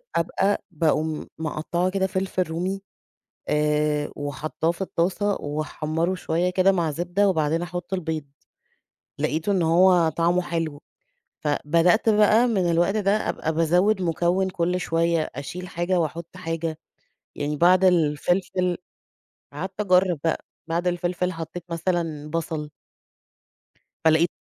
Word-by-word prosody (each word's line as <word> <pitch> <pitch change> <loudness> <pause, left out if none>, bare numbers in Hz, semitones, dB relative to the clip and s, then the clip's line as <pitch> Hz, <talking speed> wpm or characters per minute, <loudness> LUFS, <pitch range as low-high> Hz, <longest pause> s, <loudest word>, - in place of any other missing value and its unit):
أبقى 195 +4 +1
باقوم 155 -1 0
مَقطّعة 160 +3 -1
كده 190 0 0
فلفل 185 0 -1
رومي. 180 +4 -3 0.7
آآ، 150 0 +1
وحاطّاه 145 +3 -2
في 170 - -6
الطاسة 190 +3 0
وأحمّره 155 +3 -2
شوية 175 0 0
كده 185 +1 +4
مع 170 -4 0
زبدة، 175 +6 +1
وبعدين 160 -1 +1
أحط 175 +1 -4
البيض. 160 -4 -3 1.0
لقيته 160 +6 0
إن 190 -3 +2
هو 170 0 +5
طعمه 170 +3 +1
حلو. 165 -4 -3 0.6
فبدأت 165 +8 +2
بقى 215 +3 +5
مِن 185 -7 +1
الوقت 175 +5 +2
ده 200 -1 +2 0.2
أبقى 160 - -2
بازوّد 180 +5 +2
مُكوّن 175 +3 +1
كُل 180 +1 -1
شوية، 165 -1 +1
أشيل 180 +6 -6
حاجة 175 +1 0
وأحط 170 +3 -4
حاجة، 165 -2 -3 0.6
يعني 145 +1 -2
بعد 180 +3 +5
الفلفل 175 +2 +1 0.8
قعدت 185 +7 -6
أجرّب 180 -4 +3
بقى، 165 - -1 0.2
بعد 170 +2 -1
الفلفل 180 +1 -1
حطيت 165 +1 -7
مثلًا 165 -3 -2
بصل. 160 -2 -3 1.4
فلقيت 160 +2 +5
170 Hz, 120 wpm, -24 LUFS, 160-185 Hz, 1.4 s, هو